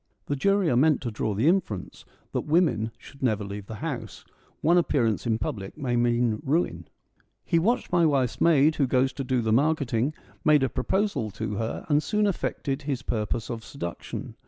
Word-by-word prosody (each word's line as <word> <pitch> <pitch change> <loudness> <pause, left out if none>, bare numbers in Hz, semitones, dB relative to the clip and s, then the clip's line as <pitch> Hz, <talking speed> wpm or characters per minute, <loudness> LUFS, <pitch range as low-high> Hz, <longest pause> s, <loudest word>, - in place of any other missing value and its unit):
(The 145 - -1
jury 195 +5 +2
are - - +2
meant 150 +4 +4
to 120 - -3
draw 105 -1 -2
the 115 +9 +2
inference 165 - -1 0.3
that - - -3
women 150 - +2
should 140 - -15
never 110 -5 +1
leave 100 0 -7
the 110 - -6
house: - - -5 0.4
one 170 +3 +5
appearance 120 -9 +1
in 110 -1 +2
public 100 -1 -5
may 130 -5 -1
mean 120 -2 +1
ruin.) 160 +6 0 0.6
He 170 - +2
watched 230 +9 0
my 175 -2 +4
wife's 135 -5 0
maid 155 -2 +4
who 140 - +2
goes 130 0 +2
to 135 - -4
do 130 -1 0
the 110 -1 +1
mark 155 +6 +3
eting, 130 +1 -1 0.3
made 150 -2 +5
a 135 - +1
proposal 135 - -1
to 105 +1 -4
her, 110 +1 -3
and 150 -1 +3
soon 210 +5 +1
effected 145 -7 -2
his 140 -3 -3
purpose 110 +1 -2
of 115 -1 -5
seduction. 85 -12 -6
130 Hz, 190 wpm, -26 LUFS, 115-155 Hz, 0.6 s, one